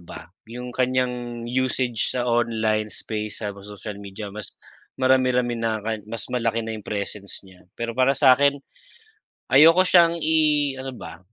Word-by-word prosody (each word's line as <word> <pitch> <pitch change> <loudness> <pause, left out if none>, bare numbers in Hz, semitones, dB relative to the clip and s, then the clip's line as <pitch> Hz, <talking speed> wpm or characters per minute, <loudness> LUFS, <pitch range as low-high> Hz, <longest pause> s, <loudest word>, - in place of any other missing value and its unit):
ba, 85 -1 -11 0.2
'yung 125 +2 -7
kanyang 125 -1 -1
usage 125 -2 0
sa 125 - 0
online 110 -3 0
space 105 0 -5
sa 105 - -2
social 105 +1 -9
media 100 +1 -8
mas 105 -1 -8 0.4
marami-rami 130 -2 +2
na, 110 -2 -1
ka 110 +1 -2
mas 115 -1 -7
malaki 115 -2 0
na 115 - -5
'yung 105 - -14
presence 100 -1 -5
niya. 95 -2 -19
Pero 115 0 -4
para 130 +3 +2
sa'kin, 140 +1 +5 1.0
ayoko 165 +7 +7
siyang 170 -2 +5
i-ano 150 -4 +1
ba, 85 -7 -10
120 Hz, 145 wpm, -23 LUFS, 105-130 Hz, 1.0 s, ayoko